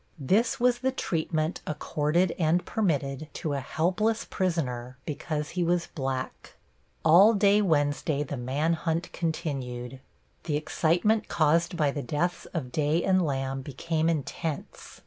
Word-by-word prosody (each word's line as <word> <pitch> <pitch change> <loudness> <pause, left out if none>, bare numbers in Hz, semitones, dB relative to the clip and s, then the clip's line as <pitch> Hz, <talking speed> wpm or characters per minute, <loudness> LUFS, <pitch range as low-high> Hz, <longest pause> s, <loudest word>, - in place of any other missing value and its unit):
This 225 - +1
was 245 0 +3
the 260 +1 +1
treatment 160 -7 -1
accorded 155 +3 0
and 165 +2 +2
permitted 150 -8 -1
to 150 - -3
a 140 - -1
helpless 185 - 0
prisoner 130 -9 -2
because 150 0 -3
he 175 0 -1
was 170 0 0
black. 135 -3 -4 0.5
All 190 +8 +7
day 205 +1 +4
Wednesday 145 -4 +1
the 145 0 -5
man 140 +6 0
hunt 165 +1 -2
continued. 135 -7 -3 0.5
The 150 -3 0
excitement 175 +8 +1
caused 165 +3 +2
by 150 -3 +2
the 145 - -4
deaths 150 +8 -2
of 140 -8 -5
Day 155 +4 +1
and 185 -1 +3
Lamb 135 -2 -2
became 155 +4 -1
intense. 155 0 -4
160 Hz, 135 wpm, -27 LUFS, 145-175 Hz, 0.5 s, All